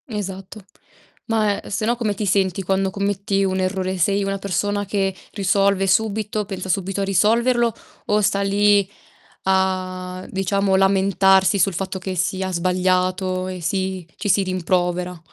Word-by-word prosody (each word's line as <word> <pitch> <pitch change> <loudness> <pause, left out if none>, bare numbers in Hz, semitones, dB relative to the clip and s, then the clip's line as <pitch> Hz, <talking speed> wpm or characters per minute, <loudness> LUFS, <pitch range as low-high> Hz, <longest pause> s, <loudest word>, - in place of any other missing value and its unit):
Esatto. 195 -3 -6 0.7
Ma, 215 -3 0
ehm, - - -11
se 205 +2 -2
no 240 +2 +2
come 225 -4 -1
ti 205 +1 -3
senti 190 -1 +1
quando 190 +1 0
commetti 200 0 -1
un 190 -1 0
errore, 185 0 -1
sei 200 +3 +1
una 195 0 -2
persona 205 +2 -1
che 195 -1 -1 0.2
risolve 195 0 +2
subito, 210 +1 0
pensa 190 -1 -6
subito 195 +2 -1
a - - +1
risolverlo 230 +5 +2 0.3
o 210 0 +2
sta 200 0 +1
lì 200 0 +3 0.5
a 185 -1 -1
diciamo 195 0 0
lamentarsi 195 0 +3
sul 190 +1 +2
fatto 190 +2 -3
che 190 0 -4
sia 185 +2 -1
sbagliato 185 +1 0
e 185 -1 -5
si 190 +1 -2
ci 205 - -3
si 195 +1 +4
rimprovera? 180 -1 -1
195 Hz, 150 wpm, -21 LUFS, 185-200 Hz, 0.7 s, si